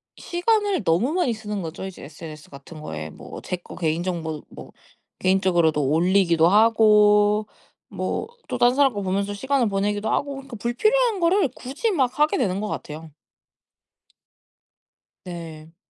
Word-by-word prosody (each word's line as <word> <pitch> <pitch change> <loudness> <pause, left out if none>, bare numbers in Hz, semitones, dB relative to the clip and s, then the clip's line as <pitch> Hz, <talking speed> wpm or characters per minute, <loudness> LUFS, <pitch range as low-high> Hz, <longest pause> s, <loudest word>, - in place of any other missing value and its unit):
시간을 405 - 0
너무 190 - +1
많이 350 -9 +1
쓰는거죠 205 -6 -5
이제 190 -1 -9
SNS 155 +1 -10
같은 145 +3 -12
거에. 80 - -6
뭐 - - -10
제 - - -3
거 175 - -12
개인 165 0 -1
정보도 160 -4 -4
뭐 - - -11 0.5
개인적으로도 175 -5 +2
올리기도 170 +1 +3
하고 210 0 +4 0.4
뭐 - - -3 0.2
또 - - -2
딴 245 +1 +4
사람 275 -2 +4
거 205 - -3
보면서 200 +1 -1
시간을 265 +3 0
보내기도 205 +2 -1
하고 280 +5 -1
그니까 270 -2 -9
불필요한 430 - +1
거를 350 0 +3
굳이 280 - -2
막 265 -6 0
하게 305 +6 +3
되는 190 - 0
것 210 - -3
같아요. 155 -4 -7 2.1
네. 165 -2 -9
205 Hz, 300 characters per minute, -23 LUFS, 170-260 Hz, 2.1 s, 하고